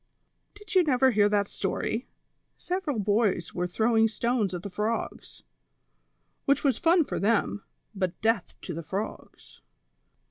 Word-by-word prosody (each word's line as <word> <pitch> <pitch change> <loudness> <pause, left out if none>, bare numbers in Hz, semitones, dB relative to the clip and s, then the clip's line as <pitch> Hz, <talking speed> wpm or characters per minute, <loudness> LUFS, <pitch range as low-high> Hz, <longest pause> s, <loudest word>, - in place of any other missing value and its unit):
"Did 415 +1 -9
you 375 - +6
never 265 -4 +3
hear 205 -2 +4
that 205 -1 +2
stoiT? 220 +5 -2 0.5
Several 355 -8 -2
boys 205 -4 +1
were 180 0 -1
throwing 225 +4 +3
stones 225 -1 0
at 180 -1 -5
the 200 - -5
frogs, 215 +4 -3 1.0
whicli 280 - +3
was 275 -3 +2
fun 340 0 +4
for - - -4
them, 210 -1 +1 0.3
but 185 -3 -2
death 220 -3 0
to 175 - -5
the 165 - -5
frogs." 195 +6 -7
220 Hz, 140 wpm, -27 LUFS, 200-255 Hz, 1.0 s, you